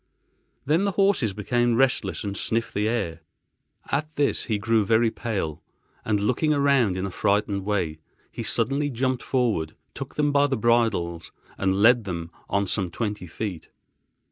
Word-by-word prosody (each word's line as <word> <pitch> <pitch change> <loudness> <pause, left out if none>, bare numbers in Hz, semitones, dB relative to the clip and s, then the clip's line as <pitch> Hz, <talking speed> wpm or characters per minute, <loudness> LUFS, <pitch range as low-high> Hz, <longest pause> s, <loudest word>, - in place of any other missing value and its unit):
Then 160 +7 +2
the 200 - 0
horses 195 - +2
became 120 +3 +1
restless 130 -1 +1
and 100 -1 -3
sniffed 115 +3 -1
the 105 +1 0
air. 100 -9 -2 0.7
At 150 +2 -1
this 145 -1 +1
he 110 -4 0
grew 110 +1 +2
very 110 +2 +3
pale, 90 -11 -3 0.4
and, 105 -2 +1
looking 125 +9 +1
around 135 -9 +3
in 95 - -2
a 95 - -4
frightened 100 +1 0
way, 90 -7 -1 0.3
he - - -6
suddenly 145 +2 0
jumped 130 0 -1
forward, 110 - 0 0.2
took - - -7
them 150 -1 +2
by 145 0 +4
the 135 - -1
bridles 110 -8 +1 0.2
and 95 +1 +1
led 120 -1 +6
them 85 -3 -5 0.2
on 100 0 +1
some 95 -1 -1
twenty 105 -1 -4
feet. 90 0 -5
110 Hz, 160 wpm, -25 LUFS, 100-130 Hz, 0.7 s, led